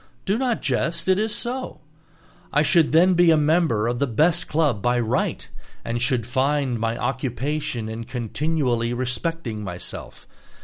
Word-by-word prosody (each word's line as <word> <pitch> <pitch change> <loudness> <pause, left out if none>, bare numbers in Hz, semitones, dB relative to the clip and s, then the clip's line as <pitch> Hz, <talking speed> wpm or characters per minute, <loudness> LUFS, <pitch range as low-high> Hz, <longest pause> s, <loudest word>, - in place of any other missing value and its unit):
Do 195 - +1
not 245 -1 -1
jest, 160 +6 0
it 190 +1 +3
is 215 0 0
so. 255 +2 -4 0.7
I 150 - +3
should 160 0 +3
then 180 +4 +5
be 175 -1 +5
a 160 - +5
member 150 -8 +2
of 120 0 -1
the 140 - +1
best 160 +9 +2
club 150 -9 +1
by 120 +3 +1
right, 115 -2 -1 0.4
and 120 0 -2
should 125 -3 +2
find 130 0 0
my 115 +1 -1
occupation 130 0 -2
in 110 +1 -6
continually 125 0 -1
respecting 125 -2 -3
myself. 90 -2 -8
135 Hz, 150 wpm, -23 LUFS, 120-165 Hz, 0.7 s, then